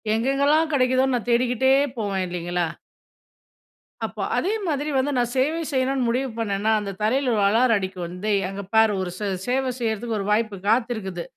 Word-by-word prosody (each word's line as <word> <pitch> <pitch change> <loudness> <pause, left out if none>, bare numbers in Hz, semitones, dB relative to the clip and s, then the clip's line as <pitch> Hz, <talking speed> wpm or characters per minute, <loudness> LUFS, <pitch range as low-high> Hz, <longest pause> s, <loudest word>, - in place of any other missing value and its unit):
எங்கெங்கலாம் 280 +6 +2
கெடைக்குதோன்னு 255 0 +2
நான் 240 +1 -6
தேடிக்கிட்டே 250 +2 +3 0.3
போவேன், 195 -3 -1
இல்லேங்களா! 175 -1 -2 1.4
அப்போ - - -6 0.2
அதே 400 +4 0
மாதிரி 295 0 -1
வந்து 270 +2 +1
நான் 240 0 0
சேவை 305 +6 +1
செய்யணுன்னு 260 -1 +1
முடிவு 255 +3 0
பண்ணேன்னா, 210 0 0
அந்த 200 -1 -4
தரையில 255 +4 +1
ஒரு 205 - +2
அலாரம் 230 0 +3
அடிக்கும், 185 -2 -4
வந்து 180 +5 -5 0.2
அங்க 195 +1 -5
பாரு 220 -1 +5
ஒரு 180 -1 -3
சே 210 - -3 0.2
சேவை 260 +1 +1
செய்யிறதுக்கு 225 -1 -2
ஒரு 195 - -3
வாய்ப்பு 215 -1 +1
காத்திருக்குது. 220 -7 0
235 Hz, 160 wpm, -23 LUFS, 200-260 Hz, 1.4 s, பாரு